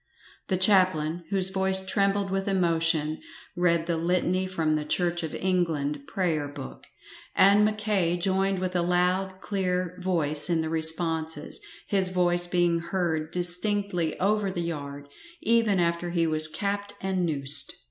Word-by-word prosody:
The 185 - 0
chaplain, 180 -4 +2
whose 190 -2 +4
voice 190 0 +3
trembled 195 0 0
with 195 0 -2
emotion, 165 -4 +1 0.4
read 170 -2 +1
the 170 -1 -1
Litany 180 +2 0
from 160 -4 -1
the 155 - -2
Church 175 +3 -1
of 160 -2 -5
England 155 -6 -1
Prayer 165 -6 -1
book, 145 -2 -10 0.5
and 200 +2 +5
Mackay 210 -5 0
joined 190 +2 0
with 185 0 -3
a 175 - +2
loud, 180 +2 0
clear 180 -3 -2
voiee 155 -4 +1
in 165 -2 +1
the 160 - -3
responses, 160 -1 -2 0.2
his 190 -2 0
voice 175 -1 +1
being 175 -1 +1
heard 170 -3 -2
distinctly 180 0 +1
over 205 +1 +1
the 175 -2 -3
yard, 145 -3 -6 0.4
even 225 -4 +2
after 170 0 0
he 170 -1 0
was 155 -1 +2
capped 205 +4 -3
and 190 -1 -2
noosed. 145 -3 +1
175 Hz, 145 wpm, -26 LUFS, 160-190 Hz, 0.5 s, and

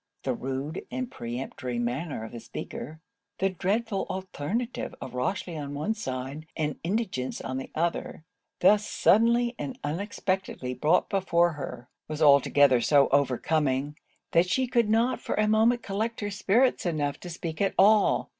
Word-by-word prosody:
The - - 0
rude 135 +5 -4
and 255 -1 -4
peremptory 120 +1 -5
manner 125 +2 -2
of 110 - -8
the 120 - -7
speaker; 155 +6 -7 0.4
the 195 0 +1
dreadful 200 +3 -1
alternative 190 - -3
of 130 - -7
Rochely 165 +7 -2
on 145 -2 -5
one 175 +10 -1
side, 135 - -5
and 150 -3 -2
indigence 185 - -2
on 130 0 -4
the 135 - -7
other, 165 -1 -2 0.4
thus 205 +3 +5
suddenly 235 +3 +3
and 145 - -5
unexpectedly 185 -4 -2
brought 155 +7 +2
before 175 -4 +2
her; 140 -5 -7 0.2
was 155 -1 -5
altogether 140 -3 +5
so 140 +3 +4
overcoming, 140 +1 +1 0.4
that 175 +2 +3
she 260 +6 +2
could 235 -3 +1
not 235 +3 +2
for - - -2
a 215 0 +2
moment 225 +3 +3
collect 220 +4 -2
her 205 0 -2
spirits 215 +5 +2
enough 150 -5 -1
to 180 - -8
speak 165 -1 -5
at 195 - +1
all. 210 +2 +4
165 Hz, 155 wpm, -27 LUFS, 140-210 Hz, 0.4 s, thus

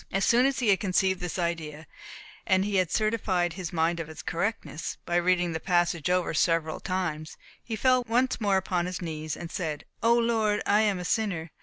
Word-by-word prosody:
As 195 +1 +1
soon 245 +3 +4
as 275 - -1
he 245 -5 +1
had 195 - +4
conceived 190 -1 +1
this 180 -1 -4
idea, 165 -3 -3 0.6
and 190 -2 +3
had 190 -4 +1
certified 190 -5 0
his 180 -2 -5
mind 170 0 0
of 160 -1 -5
its 160 0 -9
correctness, 170 -1 -3
by 175 - -2
reading 175 0 +2
the 160 - -3
passage 175 -3 +1
over 180 -1 +1
several 160 0 +1
times, 170 -5 -3 0.3
he 225 - -4
fell 255 +3 +3
once 245 +2 +1
more 200 -2 +3
upon 180 -2 -1
his 180 -1 -4
knees, 155 -3 -4
and 170 0 -7
said, 155 -5 -4 0.2
"O 230 +1 +4
Lord, 220 -3 +1
I 210 +1 +4
am 205 -3 +2
a 180 - -5
sinner. 175 -6 -1
180 Hz, 195 wpm, -27 LUFS, 165-210 Hz, 0.6 s, soon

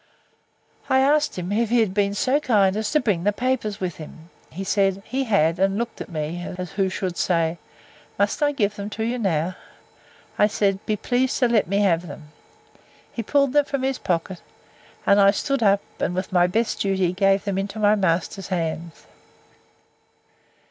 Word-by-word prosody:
I 265 - +4
asked 290 0 +2
him, 180 +1 -4
If 225 +2 +1
he 240 +1 +3
had 215 -5 +1
been 200 0 +1
so 260 +7 +2
kind 205 -8 +2
as 215 0 -1
to 305 - +3
bring 205 - 0
the 205 - +3
papers 230 -2 -2
with 180 -3 -4
him? 160 +1 -12 0.2
He 190 +4 -6
said, 195 0 +1
He 270 +1 -2
had; 175 -7 +2
and 195 +1 +2
looked 235 +1 -4
at - - -7
me, 165 +1 -4
as 180 -1 -5
who 195 -1 0
should 185 -2 -4
say, 165 -1 0 0.6
Must 200 +6 0
I 290 0 +3
give 210 -7 -1
them 200 0 -5
to 215 +1 -4
you 240 +2 -2
now?—I 185 +2 -3
said, 200 -2 0
Be 215 - +1
pleased 250 +4 0
to 250 - +3
let 230 -6 +2
me 200 +3 +1
have 175 -3 +1
them. 150 0 -10 0.8
He 230 - -3
pulled 280 +3 +1
them 290 -1 +4
from 275 -2 -3
his 265 -1 -1
pocket; 175 +1 -2 0.6
and 200 0 +5
I 195 - +7
stood 275 +6 0
up, 200 -2 +4 0.2
and, 180 - -1
with 185 0 -4
my 175 -1 +4
best 225 +5 -1
duty, 190 -3 +1
gave 195 0 +2
them 195 -2 -2
into 200 +2 -4
my 210 -1 +4
master's 190 -1 -1
hands. 165 -2 -4
200 Hz, 185 wpm, -23 LUFS, 180-230 Hz, 0.8 s, I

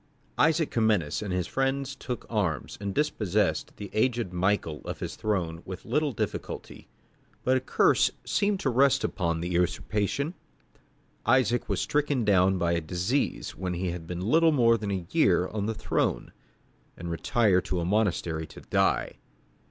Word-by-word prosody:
Isaac 160 0 +3
Comnenus 105 -10 +1
and 105 -3 -4
his 90 -1 0
friends 135 +5 -1
took 125 -2 -5
arms, 100 -9 -1
and 100 -1 -2
dispossessed 105 -7 0
the 100 - -7
aged 115 -4 0
Michael 90 -4 0
of - - -6
his - - -5
throne 85 -6 -2
with 95 -1 -8
little 145 +5 +1
difficulty. 115 - -5 0.6
But 130 +1 +3
a - - +1
curse 130 - +3 0.2
seemed 200 -1 +1
to 135 - +1
rest 135 +2 +3
upon 85 -3 -1
the 85 - -3
usurpation; 105 - 0 0.9
Isaac 120 -1 +2
was - - 0
stricken 145 -5 0
down 95 -2 +4
by 85 -1 +1
disease 90 - -1
when 90 -1 -3
he 90 0 -2
had 85 -2 -7
been 90 0 -4
little 160 - +4
more 120 -5 +4
than 105 -3 -4
a 95 -3 -2
year 95 - +3
on 105 -1 -3
the 110 - -2
throne, 85 - -1 0.7
and 85 0 -5
retired 95 +2 +2
to 90 - -1
a 85 - -1
monastery 85 -5 0
to - - -12
die. - - 0
105 Hz, 160 wpm, -27 LUFS, 90-130 Hz, 0.9 s, down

